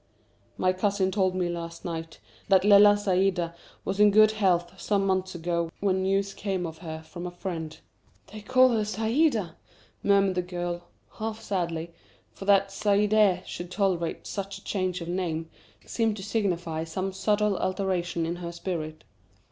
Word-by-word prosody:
"My 185 0 +2
cousin 190 0 +1
told 185 -2 +1
me 180 -1 0
last 170 -1 -6
night 165 -1 -5 0.3
that 195 0 +4
Lella 205 0 +8
Saïda 185 -4 +1 0.3
was 195 +1 -2
in 210 0 +7
good 215 +1 +6
health 185 -3 0
some 200 -2 +1
months 185 -1 0
ago 170 0 -1
when 190 -2 +1
news 195 +1 0
came 190 -3 -2
of 160 -1 -7
her 160 -2 -7
from 175 +2 -7
a - - -3
friend." 175 -3 -5 0.6
"They 215 - -7
call 255 +3 +5
her 225 -3 +1
Saïda!" 220 - +1 0.5
murmured 195 -1 +3
the 180 - 0
girl, 175 -1 -4 0.3
half 220 0 -4
sadly; 170 -5 -3 0.4
for 195 - -9
that 195 -1 +4
Saidee 205 -2 +3
should 175 0 -6
tolerate 185 -4 -1
such 195 -1 -5
a 195 - -16
change 185 -2 -2
of 170 - -6
name, 170 -3 -2 0.3
seemed 225 -2 0
to 195 - -7
signify 175 -7 -1
some 185 +4 -3
subtle 210 +1 +1
alteration 185 -3 -1
in 170 +2 -3
her 170 -1 -5
spirit. 160 -3 -5
185 Hz, 160 wpm, -27 LUFS, 175-200 Hz, 0.6 s, Lella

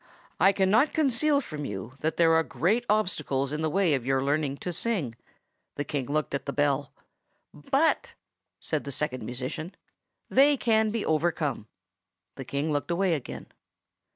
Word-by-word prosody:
I 195 - +6
cannot 205 +9 +3
conceal 290 0 +3
from 150 - -6
you 105 0 -6
that 160 +1 -1
there 165 -1 +5
are 160 - +5
great 180 - 0
obstacles 150 -10 0
in 150 +1 -3
the 160 - +1
way 180 -1 +2
of 135 -4 0
your 135 +1 +1
learning 140 0 0
to 180 - -2
sing—" 180 - -1 0.6
The 145 - -2
King 140 -3 -3
looked 150 0 -1
at 140 0 -3
the - - -1
bell. 145 0 0 0.6
"But," 285 +3 0 0.4
said 155 -2 -2
the 140 - -6
Second 130 -2 -2
Musician, 135 +8 -5 0.5
"they 280 +2 +5
can 220 -3 +2
be 220 0 -2
overcome." 155 -7 0 0.7
The 135 - -7
King 140 +5 -2
looked 145 +2 -1
away 175 +1 +1
again. 145 -6 -6
155 Hz, 160 wpm, -27 LUFS, 140-200 Hz, 0.7 s, I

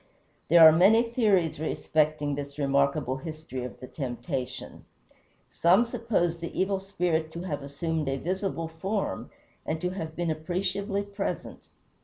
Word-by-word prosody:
There 165 0 +9
are - - +9
many 195 +8 +6
theories 210 - +1
respecting 155 -1 0
this 140 0 -6
remarkable 140 -1 +1
history 155 -3 -6
of 125 - -7
the - - -8
temptation. 130 -1 -5 0.7
Some 185 +8 +4
suppose 225 -8 -1
the 170 - -5
Evil 195 0 +1
Spirit 175 -5 -1
to 170 - -5
have 155 -6 -3
assumed 150 +2 -2
a 135 - -1
visible 185 +1 -2
form, 190 - -3 0.3
and 155 +1 -2
to 180 +2 -1
have 160 -4 -5
been 175 -2 -1
appreciably 195 +5 -2
present. 200 0 -5
165 Hz, 140 wpm, -28 LUFS, 145-190 Hz, 0.7 s, There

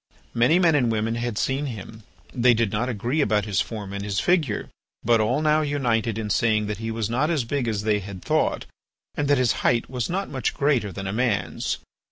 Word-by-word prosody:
Many 125 +9 +4
men 175 -3 +4
and 125 -6 +2
women 110 +1 0
had 120 -2 -3
seen 135 +4 0
him. 110 -2 -8 0.3
They 125 -1 +4
did 110 -3 +1
not 115 +4 -1
agree 125 +6 -1
about 105 -5 +1
his 100 -4 +1
form 105 -4 -6
and 100 0 -4
his 100 -3 -1
figure, 155 - +1 0.4
but 115 -2 +4
all 125 +8 +1
now 155 0 +3
united 120 -7 0
in 105 -2 -3
saying 110 0 +2
that 105 0 -4
he 115 0 -4
was 110 -1 -2
not 130 +7 0
as 155 -7 +1
big 125 +1 -2
as 105 -2 -1
they 105 -1 +2
had 95 -2 -8
thought, - - 0 0.5
and 145 - -1
that 145 0 +4
his 125 -3 +3
height 120 +1 +1
was 125 -3 -2
not 195 +3 -2
much 135 -3 -2
greater 135 -8 +1
than 95 +2 -6
a 95 - -3
man's. 100 -9 -1
115 Hz, 220 wpm, -24 LUFS, 105-135 Hz, 0.5 s, Many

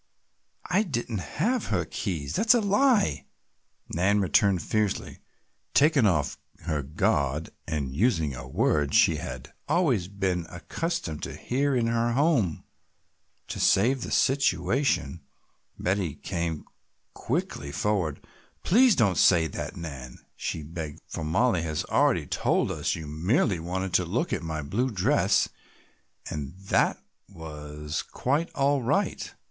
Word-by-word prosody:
"I 185 +4 +3
didn't 120 - -3
have 175 - -1
her 90 -5 0
keys, 80 -8 -4
that's 230 - +4
a - - +4
lie," 205 - +2 0.7
Nan 95 +5 +2
returned 95 -1 +3
fiercely, 105 -2 -1 0.6
taken 145 -5 +5
off 75 -7 0 0.2
her 75 -2 -1
guard 70 +1 0 0.2
and 70 -5 -3
using 85 - +1
a 65 0 -8
word 75 +2 +1
she - - +5
had 65 -1 -7 0.2
always 130 - +2
been 95 -4 -2
accustomed 90 - -4
to - - -5
hear 140 +2 0
in 120 -2 +2
her 115 0 +1
home. 130 - +2 0.9
To - - -4
save 125 +7 +3
the - - -4
situation 120 - +1 0.6
Betty 90 -5 -1
came 85 -4 -3 0.5
quickly 70 0 -3
forward. 85 -1 -1 0.4
"Please 240 +4 +5
don't 100 -7 +2
say 85 -3 +5
that, 80 - -5
Nan," 70 -7 -7 0.2
she 80 - -4
begged, 80 -1 -6
"for - - -6
Mollie 90 +4 +2
has 80 -2 -2
already - - +3
told - - 0
us - - -1
you 80 - -7
merely 85 - +1
wanted 95 +2 -3
to 90 - +3
look 120 - -1
at - - -1
my 80 -2 -4
blue 110 - -1
dress 95 -7 +2 0.8
and 75 +1 -5
that 95 0 +1 0.3
was 75 -3 -6
quite 145 +6 -1
all 140 0 +2
right. 150 - -1
90 Hz, 130 wpm, -27 LUFS, 80-125 Hz, 0.9 s, taken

